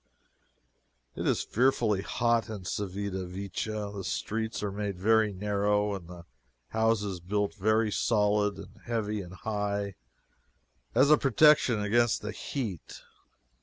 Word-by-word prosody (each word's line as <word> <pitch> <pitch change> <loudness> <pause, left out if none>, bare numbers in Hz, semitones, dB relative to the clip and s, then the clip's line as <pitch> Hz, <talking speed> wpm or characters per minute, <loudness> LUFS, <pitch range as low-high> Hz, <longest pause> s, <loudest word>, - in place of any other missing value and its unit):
It - - -3
is - - +1
fearfully 115 -5 +2
hot 115 +2 +1
in 105 -4 -6
Civita 95 -1 -3
Vecchia. 100 +3 -4
The 100 -1 -6
streets 110 +4 -3
are 105 - -1
made 100 -1 -3
very 110 +2 +3
narrow 105 +1 0
and 95 -4 -7
the 85 -1 -11 0.4
houses 110 -4 0
built 100 +3 -1
very 110 +1 +1
solid 105 -2 +2
and 105 +3 -11
heavy 110 -3 -2
and 90 0 -10
high, 100 -1 -2 1.0
as 135 +5 +5
a 150 - +7
protection 135 -3 +5
against 115 +2 +2
the 105 - -3
heat. 110 - -5
105 Hz, 130 wpm, -29 LUFS, 100-110 Hz, 1.0 s, a